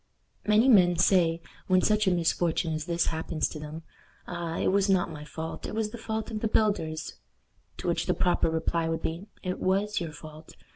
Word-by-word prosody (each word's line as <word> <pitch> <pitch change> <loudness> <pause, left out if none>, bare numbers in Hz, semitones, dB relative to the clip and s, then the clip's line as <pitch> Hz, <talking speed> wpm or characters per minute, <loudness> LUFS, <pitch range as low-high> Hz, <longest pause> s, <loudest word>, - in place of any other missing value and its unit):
Many 215 +4 +5
men 180 -8 +6
say, 170 -2 +3 0.2
when 185 -1 +3
such 215 -1 +2
a - - +5
misfortune 165 -1 +1
as 155 0 -3
this 170 0 +1
happens 160 0 -1
to 155 - -7
them, 155 +2 -7 0.4
"Ah! 170 -2 -4
it - - +1
was 200 +1 +2
not 185 -3 +2
my 150 -1 -8
fault. 160 +1 -6
It - - -6
was 220 -1 -1
the 235 - -8
fault 220 0 -4
of 215 - -3
the 220 - 0
builders;" 200 -8 0 0.6
to - - -5
which - - 0
the - - +2
proper 175 -2 +2
reply 165 0 0
would 165 0 -2
be, 170 +5 -3 0.2
"It 185 -1 -3
was 200 +3 +1
your 165 -2 -4
fault. 155 0 -12
175 Hz, 200 wpm, -28 LUFS, 160-200 Hz, 0.6 s, men